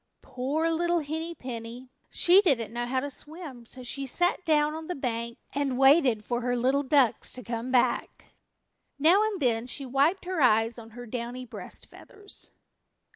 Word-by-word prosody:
Poor 275 +6 -1
little 345 +1 +1
Henny 320 +3 -4
Penny. 245 0 -8 0.2
She 365 +3 +5
didn't 245 - +1
know 240 0 -2
how 260 +1 0
to 285 - -4
swim, 295 -5 -6
so 255 +1 -6
she 270 +3 -3
sat 355 +7 +1
down 300 -1 +3
on 320 0 -7
the 360 - -3
bank 235 -3 -3 0.2
and 275 -2 -1
waited 270 -5 +4
for 240 0 -2
her 245 0 0
little 260 +4 +2
ducks 265 -4 +2
to 250 - -8
come 230 +2 -4
back. 250 -2 0 0.6
Now 330 +8 +5
and 430 -3 -1
then 240 -4 +1
she 275 +2 -4
wiped 280 +9 +1
her 365 -3 -2
eyes 225 -1 +3
on 225 -1 -11
her 245 - -7
downy 245 +2 -5
breast 230 - -9
feathers. 410 0 -12
265 Hz, 175 wpm, -27 LUFS, 240-320 Hz, 0.6 s, She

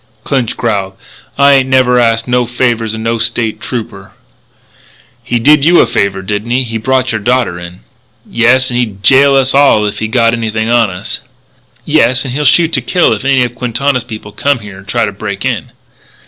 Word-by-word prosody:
Clinch 130 -5 -2
growled: 100 -5 -2 0.4
"I 140 0 +5
ain't 130 -1 +2
never 130 -1 +3
asked 115 -1 +1
no 125 -1 0
favours 120 -3 -1
of 110 - -6
no 115 +1 -2
State 115 -1 -2
Trooper 120 -4 -7 0.6
" - - -30 0.3
"He 120 - -1
did 145 +5 +4
you 170 +3 +5
a - - +5
favour, 95 -1 -1
didn't 105 +3 -4
he? 125 +2 +1
He 115 -2 -4
brought 130 +2 0
your 110 -1 -3
daughter 120 -5 0
in." 85 -2 -11 0.5
"Yes, 125 +2 +2
'n' 120 - -2
he'd 105 -5 -3
jail 135 +5 +5
us 135 -1 +2
all 135 -6 +4
if 105 - -4
he 110 - -2
got 115 0 +2
anything 110 -1 -2
on 120 -3 +3
us." 90 -1 -6 0.6
"Yes; 130 +2 +2
and 125 - -5
he'll 150 +2 -2
shoot 165 +5 +3
to - - +1
kill 175 -9 +1
if 110 - -5
any 135 -1 +2
of 120 -1 -4
Quintana's 125 +1 -2
people 110 -3 -9
come 140 +5 0
here 105 -4 -11
and 95 - -16
try - - 0
to - - -4
break - - -6
in." - - -3
120 Hz, 205 wpm, -12 LUFS, 110-130 Hz, 0.6 s, I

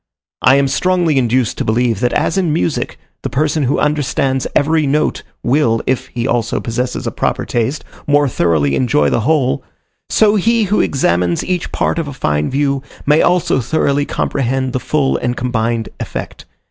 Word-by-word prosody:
I 130 - +6
am 140 0 +3
strongly 175 -1 +1
induced 125 -1 0
to - - 0
believe 115 -1 +1
that 125 0 +1
as - - +1
in 185 -5 +1
music, 160 0 -1 0.2
the - - -3
person 150 +1 0
who 130 - +1
understands 140 -2 0
every 155 +1 +2
note 150 +2 0 0.2
will, 120 -4 +2
if 130 0 -1
he 120 -1 -3
also 120 -2 0
possesses 125 +1 -3
a - - -1
proper - - -1
taste, 120 +5 -2 0.2
more 145 0 +3
thoroughly 80 - +1
enjoy 75 - +2
the - - +2
whole, 130 +1 +1 0.5
so 215 -1 +3
he 230 +3 +2
who 205 +1 +2
examines 90 -9 +1
each 180 -2 -2
part - - 0
of 160 - -3
a 140 - -6
fine 75 - -1
view, 140 0 0 0.2
may 150 +2 +4
also 175 -6 +2
thoroughly 145 +2 0
comprehend 130 -1 -1
the 130 - 0
full 135 +2 0
and 120 0 -2
combined 115 -2 -1
effect. - - -6
135 Hz, 170 wpm, -16 LUFS, 120-150 Hz, 0.5 s, I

